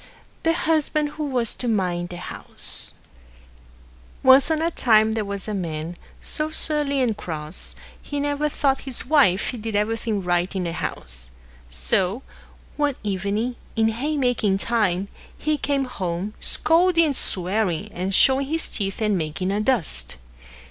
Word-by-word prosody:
THE 330 - +2
HUSBAND 310 -2 0
WHO 300 +1 -6
WAS 250 -5 -1
TO 250 - -5
MIND 180 -5 -1
THE 175 - -7
HOUSE 180 - -5 1.3
Once 265 +2 +6
on 320 -1 +1
a 330 +1 0
time 220 -6 +3
there 220 -1 -1
was 200 0 -6
a 215 - -3
man, 165 -3 -4 0.2
so 305 0 +3
surly 295 -3 +4
and 235 -4 +1
cross, 155 -3 -6 0.3
he 290 - -5
never 290 +1 -1
thought 275 -2 0
his 265 -4 -2
Wife 255 - +3
did 220 -1 -4
anything 215 -1 -1
right 175 +1 0
in 185 - -1
the 170 - -3
house. 60 - -4 0.4
So, 180 - 0 0.5
one 290 -2 +1
evening, 205 +4 -2 0.2
in 225 0 +2
haymaking 245 -5 0
time, 200 -4 +1 0.3
he 305 0 0
came 280 -1 0
home, 190 -3 -4
scolding 335 +1 +4
and 290 -3 0
swearing, 190 -1 +2
and 185 +1 -3
showing 265 +6 +4
his 320 +2 0
teeth 200 +1 -3
and 210 -1 +2
making 180 +3 -2
a 205 +1 0
dust. 190 - 0
220 Hz, 150 wpm, -23 LUFS, 185-280 Hz, 1.3 s, Once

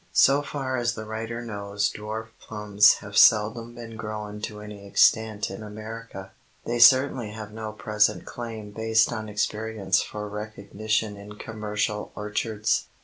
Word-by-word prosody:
So 140 +2 +5
far 135 -3 -3
as 120 0 0
the 110 - -6
writer 115 +2 -5
knows 100 -2 -2
dwarf 110 +1 -5
plums 105 -1 +4
have 100 -1 -9
seldom 115 +3 +5
been 115 -2 -9
grown 105 -1 -6
to 105 -1 -5
any 105 -1 -9
extent 110 +1 +3
in 95 - -7
America. 110 -2 -8 0.3
They 120 0 -1
certainly 130 -2 +6
have 105 -1 -8
no 110 0 -5
present 105 0 +1
claim 110 -3 -7
based 110 +2 +2
on 110 -1 -5
experience 105 -1 0
for 105 0 -5
recognition 105 0 -3
in 105 +1 -10
commercial 105 -1 -3
orchards. 105 0 -1
110 Hz, 145 wpm, -26 LUFS, 105-115 Hz, 0.3 s, certainly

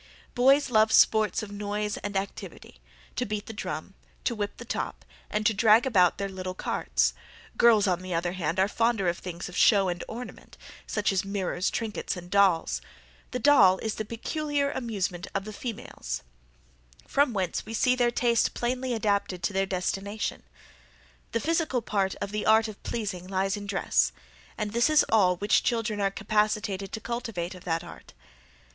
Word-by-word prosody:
Boys 270 +2 +4
love 220 -1 +4
sports 220 0 +4
of 205 - -8
noise 205 0 -3
and 205 -1 -3
activity; 195 - -7 0.3
to - - 0
beat 210 0 -3
the 225 - -7
drum, 155 -2 -5 0.3
to - - 0
whip 205 -2 -4
the 240 - -9
top, - - -4 0.2
and 210 0 -1
to 225 - +4
drag 220 +3 +5
about 185 -9 +4
their 200 - -2
little 185 -1 -6
carts: - - 0 0.4
girls, 220 -3 +5
on 180 -2 +1
the 185 0 -7
other 175 +1 0
hand, 175 -1 -2
are 190 - +4
fonder 225 -2 +1
of 170 0 0
things 175 -1 -6
of 180 - -10
show 195 -4 +5
and 175 0 -3
ornament; 245 +2 -9 0.3
such 210 -1 0
as 195 0 +1
mirrors, 195 -2 -1
trinkets, 220 -4 -3
and 175 0 -10
dolls; 195 -5 +3 0.5
the 250 - -3
doll 230 -9 +6
is 220 +1 -3
the 215 - -4
peculiar 280 +6 -2
amusement 195 -7 -3
of 195 0 -1
the 215 - -7
females; 200 - -6 0.8
from 285 -2 +2
whence 190 -5 -2
we 220 - -9
see 250 +3 +3
their 245 -1 +3
taste 235 -1 +1
plainly 250 +1 -1
adapted 200 -4 -1
to 200 - 0
their 195 0 +1
destination. 195 +3 -3 0.9
The 230 - 0
physical 315 -4 0
part 195 -3 0
of 200 - -5
the 210 0 -2
art 220 +1 +5
of 215 -2 -10
pleasing 195 -6 -4
lies 195 +1 0
in 205 -1 -7
dress; 65 - +1 0.4
and 210 - -2
this 235 +5 +3
is 310 -1 +5
all 190 -5 +4
which 205 +4 +2
children 225 -3 -1
are 195 - +2
capacitated 210 -1 -1
to 220 - -3
cultivate 230 -8 -4
of 185 - -13
that 165 -1 -1
art." 175 - -12
205 Hz, 175 wpm, -27 LUFS, 185-230 Hz, 0.9 s, doll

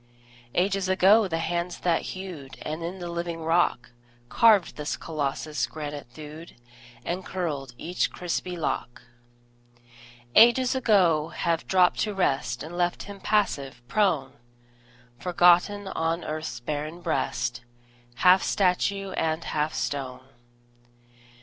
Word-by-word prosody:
Ages 190 +1 +1
ago 195 +3 +5
the 165 -3 -2
hands 170 +1 -2
that 170 -2 +2 0.2
hewed, 170 -8 -8
And 155 +2 -4
in 175 +3 -4
the 175 -2 -6
living 170 -1 -4
rock 165 -7 +1 0.4
Carved 210 - +4
this 150 -1 -3
Colossus, 150 -1 -2
granite 150 -3 -7
thewed 155 +2 -10 0.5
And 180 +2 -3
curled 145 -10 -4
each 175 +6 -1
crispy 180 0 -3
lock: 135 -6 -3 1.3
Ages 240 - +6
ago 185 - +3
have 165 0 -2
dropped 185 -2 +3
to 210 -2 -1
rest 135 -9 0
And 165 +3 -8
left 175 0 0
him 200 0 -9
passive, 140 - -1
prone, 155 -7 +1 0.9
Forgotten 180 +3 +3
on 165 0 -1
earth's 155 -6 -4
barren 150 +6 -4
breast, 120 -7 -1 0.5
Half 185 +8 +5
statue 195 +1 +1
and 160 -1 -1
half 150 0 -1
stone. 130 -2 -4
170 Hz, 120 wpm, -26 LUFS, 150-185 Hz, 1.3 s, Ages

